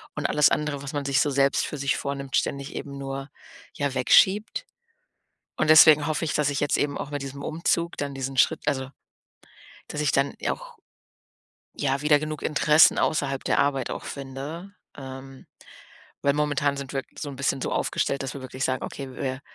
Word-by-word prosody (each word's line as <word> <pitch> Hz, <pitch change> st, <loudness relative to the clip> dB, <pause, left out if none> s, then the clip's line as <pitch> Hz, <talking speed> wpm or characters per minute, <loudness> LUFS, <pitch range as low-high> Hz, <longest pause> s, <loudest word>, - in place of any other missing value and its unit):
und 150 Hz, -, -4 dB
alles 150 Hz, -1 st, +4 dB
andere, 150 Hz, -2 st, -1 dB
was 140 Hz, -, -5 dB
man 145 Hz, -1 st, -3 dB
sich 140 Hz, +1 st, +2 dB
so 145 Hz, -, +1 dB
selbst 140 Hz, 0 st, +2 dB
für 150 Hz, -, -5 dB
sich 140 Hz, -1 st, 0 dB
vornimmt, 140 Hz, -1 st, -4 dB
ständig 140 Hz, +1 st, -2 dB
eben 140 Hz, -1 st, -6 dB
nur, 135 Hz, 0 st, -5 dB, 0.4 s
ja, 145 Hz, -2 st, -2 dB
wegschiebt. 205 Hz, -, +3 dB, 0.9 s
Und 155 Hz, -, +2 dB
deswegen 155 Hz, -1 st, +8 dB
hoffe 155 Hz, +1 st, -1 dB
ich, 155 Hz, -, -2 dB
dass 150 Hz, -1 st, +2 dB
ich 140 Hz, -, -2 dB
jetzt 145 Hz, -, +1 dB
eben 145 Hz, -1 st, 0 dB
auch 145 Hz, -, -5 dB
mit 145 Hz, -1 st, -4 dB
diesem 140 Hz, +1 st, -7 dB
Umzug 170 Hz, +1 st, -1 dB
dann 140 Hz, -1 st, -4 dB
diesen 135 Hz, 0 st, -4 dB
Schritt -, -, +3 dB
also, 135 Hz, -2 st, -1 dB, 1.0 s
dass 150 Hz, -, -4 dB
ich 150 Hz, -, +2 dB
dann 135 Hz, +1 st, +1 dB, 0.2 s
auch, -, -, -6 dB, 1.0 s
ja, 135 Hz, -1 st, 0 dB
wieder 150 Hz, 0 st, +4 dB
genug 155 Hz, 0 st, -5 dB
Interessen 150 Hz, +1 st, +5 dB
außerhalb 135 Hz, -3 st, 0 dB
der -, -, +2 dB
Arbeit 140 Hz, -3 st, +1 dB
auch -, -, -6 dB
finde. 140 Hz, +7 st, -7 dB, 0.3 s
Ähm, 135 Hz, 0 st, -10 dB, 0.8 s
weil 140 Hz, 0 st, +2 dB
momentan 145 Hz, -1 st, 0 dB
sind 140 Hz, -1 st, -6 dB
wir 135 Hz, -1 st, -1 dB, 0.2 s
so 150 Hz, -, -4 dB
'n 135 Hz, -, -9 dB
bisschen 135 Hz, 0 st, -1 dB
so -, -, -3 dB
aufgestellt, 140 Hz, -, -1 dB
dass 135 Hz, -2 st, -5 dB
wir 140 Hz, -, -7 dB
wirklich 130 Hz, 0 st, -4 dB
sagen: 130 Hz, -1 st, -1 dB
„Okay, 135 Hz, -2 st, -7 dB
wir 130 Hz, 0 st, -3 dB
140 Hz, 185 wpm, -25 LUFS, 135-150 Hz, 1.0 s, deswegen